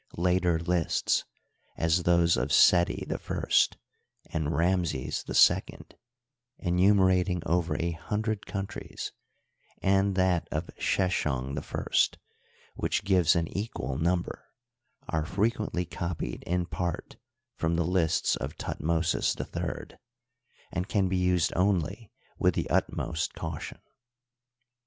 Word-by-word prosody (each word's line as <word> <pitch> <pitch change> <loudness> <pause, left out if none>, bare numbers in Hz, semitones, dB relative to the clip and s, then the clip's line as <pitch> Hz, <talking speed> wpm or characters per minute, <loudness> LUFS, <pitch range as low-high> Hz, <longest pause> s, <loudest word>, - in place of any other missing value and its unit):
Later 90 -1 +2
lists, 85 0 0 0.5
as 80 +2 +2
those 85 -1 +4
of 65 +3 -1
Seti 85 +4 +5
I - - -4 0.9
and 80 -2 -1
Ramses 85 -6 0
II, - - +4 0.8
enumerating 90 -1 +3
over 85 -2 +1
a 85 0 -1
hundred 105 +5 -3
coun 100 -1 -3
tries, - - -7 0.7
and 95 0 +2
that 95 -2 +2
of 80 +3 -3
Sheshong 70 -8 0
I, - - 0 0.6
which 100 - -1
gives 90 -5 +4
an 85 -1 +1
equal 70 - -3
num 85 +2 +2
ber, - - -9 0.6
are 80 -1 -1
frequently 100 +1 -1
copied 85 -8 -4
in 90 0 0
part 85 -1 -4 0.4
from 80 +1 0
the 85 0 +1
lists 85 -3 +2
of - - -5
Thut - - -6
mosis 85 +2 +1
III, - - -5 0.7
and 90 +3 -3
can 95 -3 +1
be 95 - 0
used 90 -2 +2
only 95 +3 0 0.3
with - - +3
the - - -1
utmost 85 0 -1
caution. - - -5
90 Hz, 115 wpm, -28 LUFS, 80-95 Hz, 0.9 s, Seti